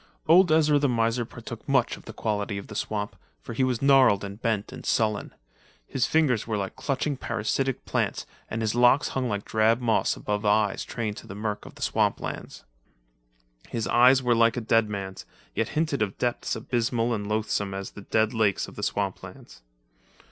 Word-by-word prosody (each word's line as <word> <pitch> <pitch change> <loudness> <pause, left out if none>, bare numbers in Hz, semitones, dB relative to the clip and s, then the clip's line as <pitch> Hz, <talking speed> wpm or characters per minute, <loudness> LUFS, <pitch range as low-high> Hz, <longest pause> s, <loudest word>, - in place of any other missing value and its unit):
Old 175 +1 +6
Ezra 155 -2 +4
the 145 -1 +2
miser 115 0 +1
partook 115 +2 -9
much 135 -3 +2
of - - -16
the - - -7
quality 105 -2 -2
of 100 - -6
the 105 - -10
swamp, 105 -1 -3 0.2
for - - -8
he 130 - +1
was 130 -1 0
gnarled 135 -8 +5
and 100 +2 -7
bent 110 -4 -1
and - - -9
sullen; 110 -3 0 0.5
his 130 - 0
fingers 140 -10 +2
were 110 -2 -1
like 100 -1 -4
clutching 140 +1 -1
parasitic 130 +2 -2
plants - - -1 0.2
and 115 0 -3
his 110 - 0
locks 120 +3 +4
hung 130 -2 -2
like 100 -1 -3
drab 110 +2 +2
moss 115 -3 +1
above 105 0 -3
eyes 105 -1 +2
trained 110 -3 -4
to - - -10
the 95 - -8
murk 105 0 -4
of - - -13
the - - -6
swamplands. - - -2 1.1
His 115 - -2
eyes 130 +2 +5
were 120 -1 +3
like 115 +1 +3
a - - -1
dead 115 -1 +2
man's, 95 -2 -5 0.3
yet - - -1
hinted 155 -5 0
of 100 -3 -1
depths 120 -1 -1
abysmal 120 0 0
and 105 -2 -3
loathsome 105 -2 -1
as 95 0 -5
the 105 - -10
dead 110 +3 +1
lakes 110 -4 +1
of - - -12
the - - -7
swamplands. - - -4
115 Hz, 190 wpm, -26 LUFS, 105-125 Hz, 1.1 s, Old